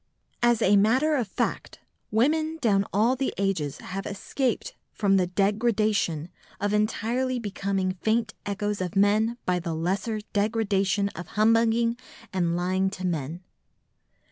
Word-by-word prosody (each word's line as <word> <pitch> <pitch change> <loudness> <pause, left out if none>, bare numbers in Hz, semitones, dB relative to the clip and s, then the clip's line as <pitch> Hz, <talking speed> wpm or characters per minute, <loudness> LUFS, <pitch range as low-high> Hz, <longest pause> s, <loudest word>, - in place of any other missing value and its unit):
As 240 -2 +3
a 205 +2 +5
matter 255 +10 +3
of 245 -6 0
fact, - - -3 0.3
women 310 +8 +1
down 200 -6 +2
all 225 +6 +3
the 265 +1 -1
ages 185 -8 -1
have 195 +1 -6
escaped 260 - -2 0.2
from 195 -2 +2
the 180 -1 +2
degradation 205 -4 +1 0.3
of 205 0 0
entirely 230 +4 0
becoming 195 -3 -1
faint 225 0 +1
echoes 205 0 -2
of 180 0 -3
men 215 +4 +3
by 180 -1 +1
the 165 -2 -3
lesser 195 +7 -1
degradation 200 -2 +1
of 175 -2 -8
humbugging 230 +2 +3 0.4
and 170 -2 +1
lying 185 +2 +1
to 185 -1 -6
men. 165 0 -3
205 Hz, 135 wpm, -26 LUFS, 190-230 Hz, 0.4 s, a